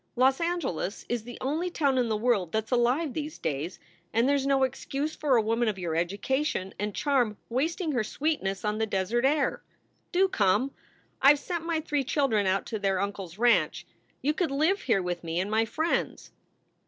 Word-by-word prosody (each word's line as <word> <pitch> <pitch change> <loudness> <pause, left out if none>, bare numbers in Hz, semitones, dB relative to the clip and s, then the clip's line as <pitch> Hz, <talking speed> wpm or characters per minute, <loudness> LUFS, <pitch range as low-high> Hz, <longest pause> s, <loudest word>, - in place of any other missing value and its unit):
Los 265 +4 +3
Angeles 305 - -2
is 235 -2 -2
the 245 -1 -8
only 315 +7 -1
town 280 -6 +1
in 240 -2 +1
the 215 - +1
world 210 -7 +1
that 220 0 +1
s 220 - -20
alive 250 +5 +2
these 305 -1 -4
days, 160 +3 -3 0.3
and 230 +3 +2
there 285 - +3
s 275 -1 0
no 270 -1 +3
excuse 275 +3 -2
for 285 -4 +2
a 225 - +4
woman 230 +2 +1
of 210 -2 0
your 170 -3 -3
education 195 - -1
and 205 0 -2
charm 250 -8 +1
wasting 315 - -1
her 245 -5 +1
sweetness 215 -7 -2
on 210 +1 -1
the 220 - +1
desert 210 +6 0
air. 285 0 +1 0.5
Do 380 +2 +4
come! 230 - +2 0.5
I 275 +2 +8
ve - - -3
sent 335 +3 -4
my 330 -2 0
three 295 -3 -1
children 245 -8 +1
out 190 +1 +1
to 220 - -4
their 195 -2 +1
uncle 200 0 -3
s 170 +1 -14
ranch. 240 +1 +2 0.4
You 295 +3 +2
could 345 +1 0
live 315 +8 +1
here 220 -7 +1
with 175 -1 -3
me 165 +1 -2
and 190 +3 -2
my 220 +1 +3
friends." 320 +8 -2
245 Hz, 205 wpm, -28 LUFS, 205-290 Hz, 0.5 s, I